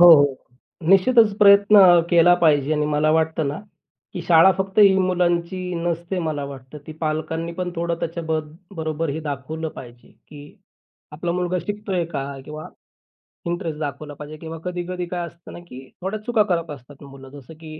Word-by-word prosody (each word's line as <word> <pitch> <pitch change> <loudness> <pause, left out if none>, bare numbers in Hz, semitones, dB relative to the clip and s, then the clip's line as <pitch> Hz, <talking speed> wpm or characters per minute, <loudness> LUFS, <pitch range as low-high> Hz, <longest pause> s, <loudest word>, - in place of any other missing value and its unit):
हो 175 - +9
हो. 145 -3 +3 0.5
निश्चितच 210 +3 +5
प्रयत्न 200 +1 +6
अ, 175 -3 +7
केला 175 +1 +6
पाहिजे 150 -2 +3
आणि 150 -1 0
मला 150 +1 +1
वाटतं 160 -1 0
ना, 145 - -4 0.5
की 180 - -5
शाळा 170 +2 +6
फक्त 190 +1 -3
ही 200 -2 +7
मुलांची 180 0 -1
नसते 170 +2 -3
मला 155 -4 -3
वाटतं. 135 +1 -10
ती 155 - -8
पालकांनी 160 +1 -3
पण 180 +1 -4
थोडं 170 0 -1
त्याच्या 170 +1 -4
ब-बरोबर 160 0 -4
ही 155 - -4
दाखवलं 155 +2 -5
पाहिजे, 120 -4 -13 0.2
की 145 -1 -13 0.6
आपला 170 +3 -3
मुलगा 180 0 -1
शिकतोय 205 -4 -2
का 140 -5 -4 0.2
किंवा, 155 +2 -9 0.8
इंटरेस्ट 170 -3 -4
दाखवला 145 0 -5
पाहिजे. 150 +2 -10
किंवा 165 0 -8
कधी-कधी 180 0 -4
काय 175 0 -4
असतं 170 0 -14
ना, - - -9
की 130 -6 -12
थोड्या 195 +4 -3
चुका 235 -3 +2
करत 170 -2 -1
असतात 140 +1 -12
मुलं. 135 -1 -13
जसं 140 +2 -13
की 155 -1 -10
165 Hz, 170 wpm, -22 LUFS, 150-180 Hz, 0.8 s, हो